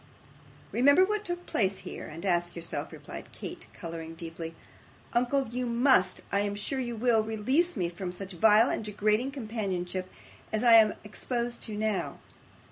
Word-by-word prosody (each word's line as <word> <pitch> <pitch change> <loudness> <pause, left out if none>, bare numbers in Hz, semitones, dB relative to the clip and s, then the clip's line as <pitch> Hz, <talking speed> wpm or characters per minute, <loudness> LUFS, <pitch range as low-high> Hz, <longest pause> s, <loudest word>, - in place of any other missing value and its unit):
'Remember 285 - +6
what 425 +1 -1
took 350 -2 -4
place 195 -2 0
here, - - -6
and 165 +5 -8
ask 175 -2 +1
yourself,' 170 0 -4
replied - - -9
Kate, - - -8
colouring 165 -1 -7
deeply. 165 0 -7 0.6
'Uncle, 250 +3 +2
you 250 +1 -2
must 235 -6 +3
I 200 - +2
am 205 0 -1
sure 235 +6 -3
you 240 -2 -3
will 230 0 +3
release 245 +10 +1
me 180 -3 +1
from 180 +1 -5
such 190 +2 -7
vile 220 +5 +5
and - - -2
degrading 210 +4 +1
companionship 195 -8 -3 0.4
as 215 +1 0
I 235 -1 +7
am 220 -2 +7
exposed 240 +3 -3
to 215 - -5
now. 215 -2 -1
215 Hz, 160 wpm, -29 LUFS, 185-245 Hz, 0.6 s, I